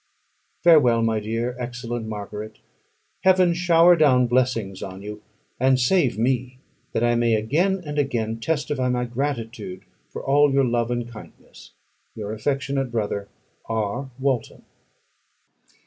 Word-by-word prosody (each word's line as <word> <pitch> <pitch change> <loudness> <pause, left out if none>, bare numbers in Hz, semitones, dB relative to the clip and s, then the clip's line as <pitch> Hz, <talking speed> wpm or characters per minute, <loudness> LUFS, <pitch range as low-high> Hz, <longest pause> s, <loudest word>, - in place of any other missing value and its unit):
Farewell, 130 -9 +5
my 110 -1 +1
dear, 115 +3 -3
excellent 120 -2 -5
Margaret. 105 0 -7 0.7
Heaven 185 -2 +5
shower 175 0 +5
down 135 -6 +4
blessings 120 -6 0
on 95 0 -7
you, 105 0 -7 0.4
and 130 0 +3
save 130 - +2
me, 125 +2 -1 0.3
that 115 - -1
I 120 0 +3
may 120 -1 +2
again 175 - 0
and 150 0 -3
again 115 -5 -1
testify 145 -1 -1
my 125 0 0
gratitude 115 -7 -4 0.3
for - - -7
all 145 +1 +4
your 135 0 +3
love 120 -1 0
and 120 -1 -2
kindness. 115 -3 -14 0.4
Your 105 -1 -5
affectionate 135 +2 -2
brother, 105 -3 -2 0.4
R. 110 +4 -2
WALTON. 130 -4 -2
120 Hz, 130 wpm, -23 LUFS, 110-140 Hz, 0.7 s, Farewell